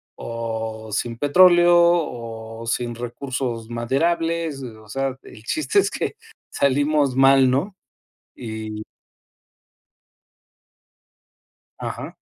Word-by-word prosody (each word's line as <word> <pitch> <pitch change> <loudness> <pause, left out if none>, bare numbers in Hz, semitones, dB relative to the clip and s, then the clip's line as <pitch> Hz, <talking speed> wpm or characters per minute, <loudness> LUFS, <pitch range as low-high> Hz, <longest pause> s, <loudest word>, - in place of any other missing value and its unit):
o 110 -1 -5
sin 115 +2 -2
petróleo 175 +5 +6
o 115 -9 -1
sin 120 +1 -1
recursos 120 -1 -4
maderables. 165 +5 -1
O 110 -4 -10
sea, 135 +2 -2
el 110 - -13
chiste 310 - +1
es - - +2
que - - -3 0.3
salimos 145 0 +1
mal, 135 -1 +6
¿no? 180 +10 -1 0.6
Y 110 -2 -6 3.0
Ajá. - - -6
130 Hz, 90 wpm, -22 LUFS, 115-150 Hz, 3.0 s, petróleo